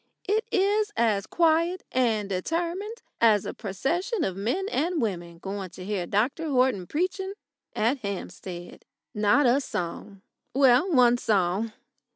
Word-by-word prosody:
It 430 +3 +1
is 415 +2 +2
as 210 -4 +2
quiet 335 +2 +2
and 225 -5 +1
determined 340 - -3 0.2
as 215 -4 +4
a - - -4
procession 330 - -2
of 190 - -1
men 240 - -1
and 330 +3 0
women 175 -7 -3
going 195 +1 -5
to 180 +1 -10
hear 195 -4 -2
Dr 260 - 0
Horton 250 -9 +2
preaching 375 +4 -2 0.4
at 235 +6 +1
Hampstead. 185 -4 -7 0.3
Not 210 +7 +3
a 250 +3 +4
song 190 -1 -5 0.3
well, 270 +6 +5
one 245 -4 +5
song. 205 +1 +1
240 Hz, 135 wpm, -26 LUFS, -, 0.4 s, well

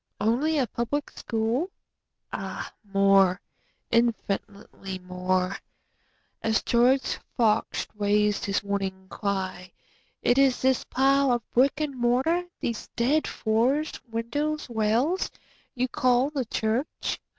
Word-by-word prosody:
Only 255 +9 +2
a 270 - +3
Public 240 +6 -3
School? 230 +9 -1 0.6
Ah - - -5 0.2
more—infinitely 195 +1 0
more;(As 185 +4 -3
George 250 +3 +3 0.2
Fox 225 -4 +2
rais'd 210 0 +1
his 200 0 0
warning 195 -2 -3
cry, 190 -3 -3 0.5
"Is 260 +1 +4
it - - -12
this 260 -1 +3
pile 275 0 +3
of 240 -2 -1
brick 270 +4 +3
and 300 -3 -2
mortar—these 255 +2 0
dead 280 +7 +2
floors, 250 +8 +1 0.2
windows, 290 +7 -2
rails—you 245 - -1
call 255 +3 +2
the 275 -4 -2
church? 225 +6 -2
235 Hz, 95 wpm, -26 LUFS, 200-270 Hz, 0.6 s, Is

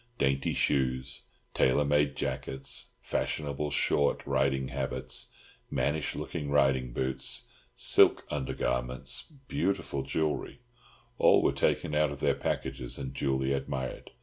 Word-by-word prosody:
Dainty 70 0 +1
shoes, 65 -1 +1 0.3
tailor 70 +3 +3
made 75 0 +2
jackets, 65 +1 -3
fashionable 75 -1 -2
short 70 0 +2
riding 65 -1 +1
habits, 65 0 -4 0.4
mannish 70 +4 0
looking 75 - -4
riding 65 -3 +3
boots, 65 +1 -1 0.3
silk - - +5
undergarments, 65 -3 -2 0.2
beautiful 100 - -1
jewellery, 75 - -2 0.6
all - - +6
were - - +3
taken - - +1
out 75 0 +3
of 70 - -6
their - - +3
packages 65 -2 -2
and 65 -1 -5
duly 65 0 0
admired. 65 -1 -3
70 Hz, 115 wpm, -30 LUFS, 65-70 Hz, 0.6 s, all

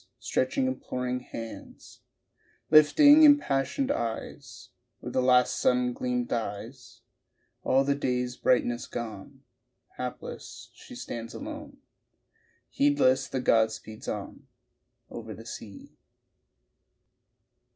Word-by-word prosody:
Stretching 270 - -1
imploring 125 - -3
hands, 115 -2 -10 0.7
Lifting 285 - +7
impassioned 275 - +4
eyes 115 - -5 0.3
Where - - -7
the 130 - +1
last 125 0 +4
sun 125 -1 +2
gleam 125 0 -2
dies; 115 +2 -6 0.6
All 135 +1 +3
the 140 +1 +1
day's 125 -3 -2
brightness 120 -2 +1
gone, 110 -5 -7 0.5
Hapless - - -7
she - - -13
stands 115 +1 -7
alone, 295 -1 -8 0.9
Heedless 135 - +2
the 130 - -3
god 110 -3 +3
speeds 110 0 -10
on - - -6 0.6
Over 110 -2 -7
the 115 - -12
sea. 105 -3 -10
125 Hz, 100 wpm, -28 LUFS, 115-150 Hz, 0.9 s, Lifting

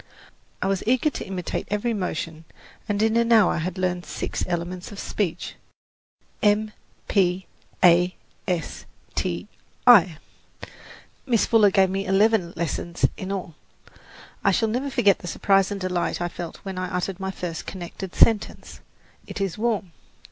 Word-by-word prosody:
I - - 0
was 195 -1 0
eager 255 +5 +3
to - - -6
imitate 185 -2 -4
every 210 +4 0
motion 165 -5 -4 0.4
and 205 +1 +1
in 220 0 +2
an 235 0 +2
hour 220 -5 +5
had 180 +3 -3
learned 180 -1 -1
six - - -4
elements 175 +2 -4
of 205 - -9
speech: 190 -6 -3 0.8
M, 210 +1 +3 0.4
P, 185 -2 +2 0.4
A, 180 +1 +5 0.3
S, 180 -3 -3 0.3
T, - - -2 0.4
I. 190 -10 +7 1.1
Miss 235 -4 +3
Fuller 220 -3 +5
gave 190 -1 +3
me 195 +1 -2
eleven 195 -2 +3
lessons 170 +1 -1
in 190 +1 -5
all. 185 -4 -4 0.9
I - - +4
shall 220 +3 +2
never 255 +5 -1
forget 205 -7 +3
the 175 - -8
surprise 195 +2 +2
and 205 -1 -4
delight 180 -2 -1
I 175 0 -1
felt 170 -1 -7
when 190 -1 -4
I 185 0 -3
uttered 185 +1 -3
my 190 0 -3
first 175 -4 -5
connected 185 0 -7
sentence, 225 -2 +2 0.5
"It - - -6
is 195 -3 -1
warm." 215 -5 -1
190 Hz, 150 wpm, -24 LUFS, 180-210 Hz, 1.1 s, I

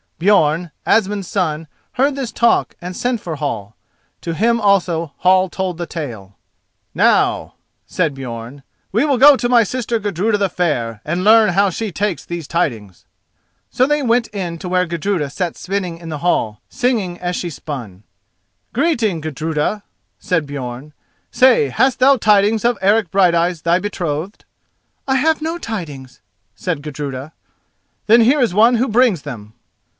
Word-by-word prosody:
Björn, 170 -3 +2 0.2
Asmund's 205 -3 +1
son, 160 -5 -2 0.3
heard 275 +2 +1
this 265 -4 -4
talk 235 0 +1
and 180 +1 -7
sent 245 +2 -1
for 165 -3 -5
Hall. 115 -8 -4 0.5
To 165 - -4
him 230 +5 +1
also 175 -6 +1
Hall 185 0 +3
told 185 -1 -3
the 175 -1 -5
tale. 110 - -7 0.6
"Now," - - +2 0.3
said 165 -5 -1
Björn, 125 0 -8 0.3
"we 220 +7 +2
will 285 -3 +2
go 285 +3 +8
to 240 -2 -2
my 240 -2 +5
sister 235 +1 -2
Gudruda 205 +1 0
the 200 -2 0
Fair, 120 - -2
and 175 +4 -2
learn 220 +1 +6
how 195 +2 +2
she 215 +3 -4
takes 195 0 -2
these 170 -4 -6
tidings." 115 - -3 0.7
So 255 - +2
they 295 0 +1
went 235 -1 +2
in 180 -5 -5
to 180 - -6
where 180 0 +2
Gudruda 170 -2 -2
sat 175 +3 -3
spinning 185 -3 -4
in 165 -1 -10
the 155 -2 -5
hall, 110 -10 0
singing 215 -8 -1
as 175 0 -3
she 175 - -3
span. 120 - -8 0.7
"Greeting, 235 - 0
Gudruda," 155 +6 -2 0.4
said 165 -5 -1
Björn; 135 +1 -7 0.4
"say, 250 - +4
hast 260 - +1
thou 270 +2 +5
tidings 210 0 +3
of 240 -1 +2
Eric 200 0 +2
Brighteyes, 175 -2 +2
thy 170 +2 +2
betrothed?" 180 -2 -4 0.6
"I 265 - +2
have 310 +4 +2
no 325 +2 -2
tidings," 160 - -7 0.3
said 165 -5 -3
Gudruda. 145 -1 -6 0.7
"Then 230 +2 +6
here 260 +6 +4
is 235 -7 +1
one 230 +5 +5
who 245 +3 +1
brings 225 - +2
them." 110 -7 -9
180 Hz, 155 wpm, -18 LUFS, 155-225 Hz, 0.7 s, go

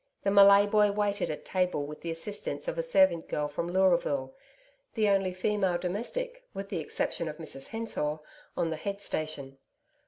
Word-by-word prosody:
The 195 - +2
Malay 200 0 +8
boy 210 0 +4
waited 205 -1 0
at 150 - -5
table 180 -6 0
with 150 +1 -9
the 170 - -5
assistance 200 - -4
of - - -2
a - - 0
servant 285 - +3
girl 150 0 -1
from 160 +4 -4
Leuraville, 170 -8 +2 0.6
the 215 -2 +2
only 195 -2 +2
female 185 -1 0
domestic 475 - -4
with 195 0 -5
the 180 - -2
exception 160 +1 -2
of 150 - -7
Mrs 135 -4 -5
Hensor 220 -10 -2 0.4
on 165 - 0
the 160 - -3
head 200 +5 -4
station. 150 -7 -3
185 Hz, 175 wpm, -29 LUFS, 155-205 Hz, 0.6 s, Malay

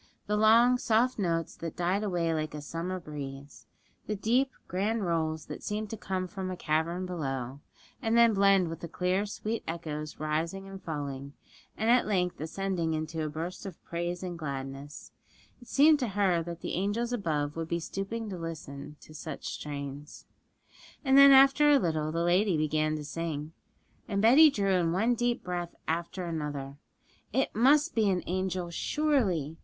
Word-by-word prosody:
The 210 - 0
long, 230 +4 +5
soft 240 +1 +2
notes 165 -4 -1
that 165 -1 -6
died 180 +3 0
away 175 -5 0
like 155 -1 -3
a 150 - -5
summer 170 +4 -4
breeze, 140 -6 -8 0.4
the 210 - -1
deep, 245 +7 +2 0.2
grand 205 +3 -1
rolls 160 -2 -1
that - - -8
seemed 210 0 -3
to - - -3
come 185 -3 -3
from 185 0 -5
a 185 - -4
cavern 165 +4 -1
below, 135 -7 -4 0.4
and 225 -1 +1
then 235 -1 +6
blend 195 -2 +4
with 165 - -6
the 170 - -6
clear, 185 +4 0
sweet 215 +2 -3
echoes 155 -2 -5
rising 165 +5 -2
and 195 0 -9
falling, 140 -3 -5 0.4
and 225 +2 +2
at 245 -2 +4
length 180 -6 0
ascending 170 -1 -2
in 155 0 -2
a 155 -1 -1
burst 165 +4 -5
of 185 - -9
praise 175 +1 -3
and 175 -2 -5
gladness 140 -1 -6 0.5
it 245 - -15
seemed 300 +2 +5
to 250 - 0
her 195 -4 +2
that 170 0 -7
the - - -4
angels 210 +6 -1
above 150 -9 -1
would 165 -1 -3
be 170 +1 -1
stooping 195 +6 -4
to 190 -4 -5
listen 150 -3 -7
to 155 - -14
such 155 -1 -7
strains. 145 0 -7 0.8
And 265 0 +4
then, 275 0 +10
after 275 +2 +7
a 290 - +7
little, 155 - 0
the 165 +1 -1
lady 180 +1 +3
began 155 0 +1
to 150 -1 -5
sing; 155 -1 -4 0.5
and 200 -3 -1
Betty 265 +9 +8
drew 200 -7 0
in 175 -3 +2
one 220 +7 +2
deep 240 0 0
breath 175 -1 -4
after 170 +3 -2
another. 145 -4 -4 0.5
It 265 - 0
must 290 +8 +4
be 220 -3 +2
an 185 -2 0
angel, 185 -1 -2
surely! 190 - 0
175 Hz, 175 wpm, -29 LUFS, 155-210 Hz, 0.8 s, then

